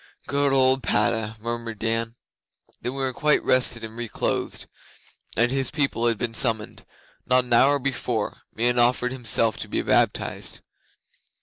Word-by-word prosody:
'Good 140 Hz, 0 st, +1 dB
old 130 Hz, 0 st, +4 dB
Padda!' 110 Hz, -2 st, 0 dB
murmured 115 Hz, 0 st, -5 dB
Dan. 115 Hz, +1 st, -1 dB, 0.6 s
'When 125 Hz, +2 st, -4 dB
we 135 Hz, -, -3 dB
were 130 Hz, -1 st, 0 dB
quite 150 Hz, +3 st, +2 dB
rested 125 Hz, -2 st, +1 dB
and 110 Hz, 0 st, -8 dB
re 120 Hz, 0 st, -4 dB
clothed, -, -, -3 dB, 0.7 s
and 120 Hz, +1 st, +3 dB
his 135 Hz, -1 st, +1 dB
people 135 Hz, -6 st, 0 dB
had 115 Hz, -2 st, +2 dB
been 115 Hz, +1 st, -2 dB
summoned 110 Hz, -2 st, +1 dB, 0.4 s
not 125 Hz, 0 st, +3 dB
an 125 Hz, -1 st, -2 dB
hour 140 Hz, +4 st, +5 dB
before 125 Hz, -5 st, -3 dB
Meon 120 Hz, +2 st, +1 dB
offered 125 Hz, +1 st, +2 dB
himself 115 Hz, -3 st, +1 dB
to -, -, -6 dB
be -, -, -1 dB
baptized. -, -, 0 dB
120 Hz, 150 wpm, -24 LUFS, 115-130 Hz, 0.7 s, hour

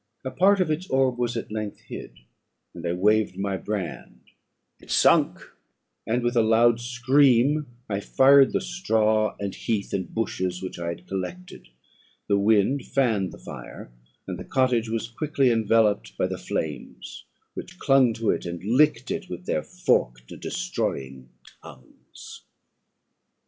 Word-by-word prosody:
A 130 Hz, -, -3 dB
part 195 Hz, +5 st, +4 dB
of 175 Hz, -4 st, +1 dB
its 165 Hz, +5 st, -2 dB
orb 130 Hz, -2 st, +1 dB
was 120 Hz, -1 st, -1 dB
at 115 Hz, -, -6 dB
length 105 Hz, -1 st, -5 dB
hid, -, -, -10 dB, 0.5 s
and 85 Hz, -, -9 dB
I 85 Hz, -, 0 dB
waved 105 Hz, +1 st, +2 dB
my 100 Hz, 0 st, -2 dB
brand; 95 Hz, -, -5 dB, 0.6 s
it -, -, -18 dB
sunk, -, -, +3 dB, 0.7 s
and, 120 Hz, +2 st, 0 dB
with 120 Hz, +1 st, 0 dB
a 115 Hz, -, +5 dB
loud 115 Hz, +1 st, +4 dB
scream, 130 Hz, +3 st, +3 dB, 0.2 s
I 100 Hz, -2 st, -2 dB
fired 135 Hz, +5 st, +5 dB
the -, -, 0 dB
straw, 110 Hz, -, +1 dB
and 100 Hz, -1 st, -3 dB
heath, 105 Hz, -4 st, -3 dB
and 95 Hz, -3 st, -3 dB
bushes, 95 Hz, -5 st, -2 dB
which 95 Hz, -, -6 dB
I 85 Hz, -, -4 dB
had 85 Hz, +1 st, -5 dB
collected. 135 Hz, -, -6 dB, 0.6 s
The 100 Hz, -1 st, +2 dB
wind 110 Hz, +6 st, +2 dB
fanned 110 Hz, -9 st, 0 dB
the -, -, -11 dB
fire, -, -, -10 dB, 0.3 s
and -, -, -6 dB
the -, -, -6 dB
cottage 125 Hz, -4 st, +1 dB
was 115 Hz, 0 st, -2 dB
quickly 135 Hz, +2 st, 0 dB
enveloped 105 Hz, -, +1 dB
by -, -, +1 dB
the -, -, -4 dB
flames, 75 Hz, -3 st, -5 dB, 0.3 s
which -, -, -9 dB
clung 135 Hz, -3 st, +4 dB
to 115 Hz, 0 st, 0 dB
it, -, -, -2 dB
and 85 Hz, 0 st, -6 dB
licked 125 Hz, +2 st, +2 dB
it 200 Hz, -2 st, -4 dB
with 180 Hz, -, -7 dB
their -, -, 0 dB
forked -, -, -1 dB
and -, -, -10 dB
destroying 65 Hz, -1 st, -4 dB, 0.3 s
tongues. 65 Hz, -, -14 dB
115 Hz, 155 wpm, -25 LUFS, 95-130 Hz, 0.7 s, a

